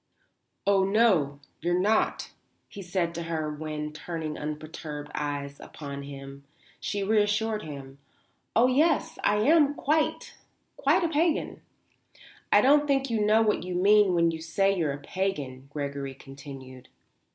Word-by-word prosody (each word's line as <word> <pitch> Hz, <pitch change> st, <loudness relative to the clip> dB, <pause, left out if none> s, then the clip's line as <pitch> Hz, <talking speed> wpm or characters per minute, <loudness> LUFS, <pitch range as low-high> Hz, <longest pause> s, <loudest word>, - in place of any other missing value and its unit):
"Oh, 200 Hz, -1 st, +4 dB
no, 190 Hz, -9 st, +3 dB, 0.2 s
you're 175 Hz, +2 st, 0 dB
not," 215 Hz, +4 st, +1 dB, 0.4 s
he 200 Hz, -, -9 dB
said 175 Hz, -2 st, -1 dB
to 170 Hz, -, -4 dB
her 160 Hz, -2 st, -3 dB
when, 150 Hz, 0 st, -5 dB
turning 155 Hz, 0 st, -5 dB
unperturbed 150 Hz, -1 st, -6 dB
eyes 145 Hz, -1 st, -4 dB
upon 140 Hz, -2 st, -8 dB
him, 140 Hz, 0 st, -9 dB, 0.4 s
she 205 Hz, -, -3 dB
assured 215 Hz, +1 st, +1 dB
him: 140 Hz, -4 st, -9 dB, 0.6 s
"Oh 235 Hz, -, +6 dB
yes, 315 Hz, +5 st, +2 dB
I 205 Hz, -, +3 dB
am 290 Hz, +5 st, +4 dB
quite, 305 Hz, +2 st, 0 dB, 0.4 s
quite -, -, +2 dB
a -, -, +3 dB
pagan." 320 Hz, +1 st, 0 dB, 0.9 s
"I -, -, +7 dB
don't 290 Hz, +2 st, +4 dB
think 270 Hz, -2 st, +1 dB
you 220 Hz, -2 st, +1 dB
know 215 Hz, +2 st, +4 dB
what 210 Hz, -1 st, +1 dB
you 180 Hz, 0 st, -5 dB
mean 200 Hz, 0 st, +5 dB
when 170 Hz, -1 st, +3 dB
you 160 Hz, -1 st, -6 dB
say 195 Hz, +4 st, +1 dB
you're 160 Hz, -6 st, 0 dB
a 140 Hz, -, -4 dB
pagan," 145 Hz, -6 st, -4 dB
Gregory 140 Hz, -2 st, -4 dB
continued. 135 Hz, -2 st, -11 dB
170 Hz, 140 wpm, -27 LUFS, 145-215 Hz, 0.9 s, I